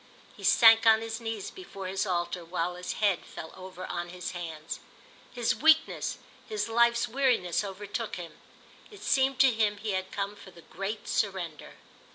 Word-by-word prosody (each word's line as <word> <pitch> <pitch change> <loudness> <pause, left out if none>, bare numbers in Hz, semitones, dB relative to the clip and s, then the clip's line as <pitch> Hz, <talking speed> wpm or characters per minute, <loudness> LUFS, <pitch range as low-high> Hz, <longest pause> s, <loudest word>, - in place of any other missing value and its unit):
He - - -13
sank 225 -1 +7
on 220 0 +7
his 225 +1 -5
knees 225 -3 -4
before 200 - -9
his 190 +2 -1
altar 175 -1 -1
while 175 +1 -2
his 180 0 -4
head 200 -4 +1
fell 160 - -9
over 185 0 -8
on 175 0 -4
his 180 +1 -5
hands. 165 -3 -6 0.5
His 240 -1 0
weakness, 315 +1 +3 0.3
his 430 - -1
life's 235 +1 +3
weariness 240 -9 +1
overtook 205 +3 -4
him. 170 -3 -9 0.5
It 415 - -13
seemed 265 0 +2
to 270 -1 +7
him 215 -2 +1
he 210 +1 -3
had 190 -1 -2
come 200 +1 -3
for 200 - -13
the 170 -2 -16
great 200 +3 -5
surrender. 185 -7 -2
200 Hz, 170 wpm, -29 LUFS, 180-230 Hz, 0.5 s, sank